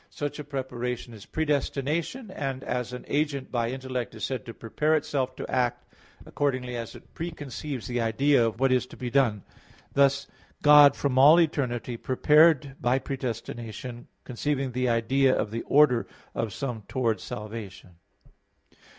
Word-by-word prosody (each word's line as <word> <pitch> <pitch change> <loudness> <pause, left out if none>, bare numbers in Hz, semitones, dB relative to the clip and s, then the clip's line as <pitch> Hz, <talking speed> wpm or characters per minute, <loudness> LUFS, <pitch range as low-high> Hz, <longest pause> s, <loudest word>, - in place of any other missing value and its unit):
Such 145 0 -5
a - - -4
preparation 125 -4 -4
is 105 -2 -12
predestination, 155 - -1
and 135 -5 -4
as 125 -1 -3
an 125 - -7
agent 145 -2 -1
by 115 -2 0
intellect 130 -2 -4
is 110 - -8
said 130 -1 -3
to 115 - -6
prepare 150 +7 0
itself 135 -4 -1
to - - -6
act, 125 -2 0 0.4
accordingly 130 -3 -2
as 115 -1 -6
it - - -15
preconceives 145 -5 -6
the 120 -1 -2
idea 120 +4 +3
of 115 0 -1
what 135 0 +3
is 125 -1 +2
to - - -13
be 125 -1 -4
done. 115 -7 +2 0.5
Thus, 140 0 +3 0.4
God 145 -1 +8
from 135 -2 0
all 150 +5 +8
eternity 125 -7 0
prepared 150 +2 +4
by 120 +2 +2
predestination, 120 -2 -5 0.2
conceiving 135 +1 -2
the 125 0 0
idea 130 +3 +3
of 105 - -2
the 115 +1 -3
order 135 -5 +4 0.3
of 115 -2 -2
some 125 -2 -4
towards 115 -4 0
salvation. 105 -3 -8
130 Hz, 150 wpm, -27 LUFS, 120-145 Hz, 0.5 s, God